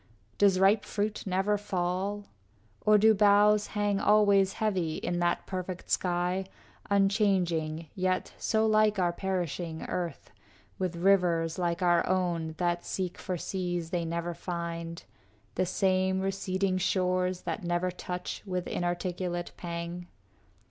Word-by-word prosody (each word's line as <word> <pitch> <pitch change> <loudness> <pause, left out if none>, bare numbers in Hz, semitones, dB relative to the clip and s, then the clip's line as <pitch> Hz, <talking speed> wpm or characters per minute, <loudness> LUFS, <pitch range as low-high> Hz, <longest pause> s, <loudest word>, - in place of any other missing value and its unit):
Does 195 -2 +4
ripe 200 +2 +4
fruit 210 0 -3
never 195 +2 +1
fall? 195 +1 -2 0.6
Or 215 0 +7
do 220 +2 +5
the - - +7
boughs 210 0 +5
Hang 205 -1 +1
always 200 -2 +4
heavy 185 -7 -1
in 175 0 -2
that 175 0 0
perfect 185 -1 -5
sky, 180 +1 0 0.4
Unchanging, 190 -6 +1
yet 185 -1 -1
so 220 0 +1
like 215 -1 +3
our 175 -2 +1
perishing 175 -3 -3
earth, 175 -2 -4 0.5
With 185 -2 -1
rivers 170 -2 +2
like 170 0 -1
our 175 -1 +4
own 170 -4 0
that 175 -1 0
seek 185 -2 -4
for 180 -1 -3
seas 175 -2 -3
They 175 -2 0
never 170 +1 -3
find, 170 -1 -5 0.5
the 185 - 0
same 190 0 +1
receding 190 -1 -1
shores 185 -1 0
That 210 - -4
never 175 +1 0
touch 180 0 -5
with 180 -3 -3
inarticulate 175 0 -2
pang? 170 0 -5
185 Hz, 130 wpm, -29 LUFS, 175-195 Hz, 0.6 s, Or